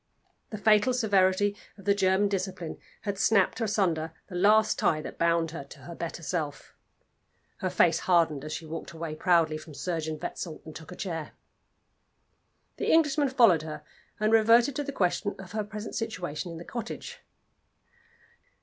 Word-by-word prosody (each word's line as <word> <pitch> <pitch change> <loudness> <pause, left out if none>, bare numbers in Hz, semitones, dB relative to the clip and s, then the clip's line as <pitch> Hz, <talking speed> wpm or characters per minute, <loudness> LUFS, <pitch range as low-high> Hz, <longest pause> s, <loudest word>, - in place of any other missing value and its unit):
The 215 - -5
fatal 210 +4 +4
severity 205 -3 +2 0.2
of 195 - -14
the 200 - +4
German 195 0 +3
discipline 185 -4 -4 0.2
had 200 -2 -3
snapped 220 +1 +3
asunder 175 -7 0 0.2
the - - -10
last 210 +4 +4
tie 155 - +2
that - - -8
bound 170 -1 +2
her 160 - -6
to 140 - -14
her 170 +6 -9
better 170 0 -6
self. 155 -3 -4 0.8
Her 185 - -2
face 175 -2 +3
hardened 165 -6 +2
as 155 - -6
she 160 - -5
walked 165 +2 -7
away 165 -1 -5
proudly 160 -2 +2
from 155 -1 -12
Surgeon 160 -2 -3
Wetzel, 160 0 -5
and 155 - -10
took 160 +2 -10
a - - -7
chair. 165 -6 -5 1.4
The - - 0
Englishman 295 -3 +3
followed 230 - +5
her, 155 -1 -7 0.4
and 215 +1 +2
reverted 230 +4 +5
to 290 - -1
the 280 - -4
question 200 -2 0
of 190 -2 -10
her 215 0 -2
present 210 +1 -7
situation 180 -7 -4
in 165 - -7
the 170 - -9
cottage. 240 - -6
185 Hz, 165 wpm, -28 LUFS, 165-215 Hz, 1.4 s, followed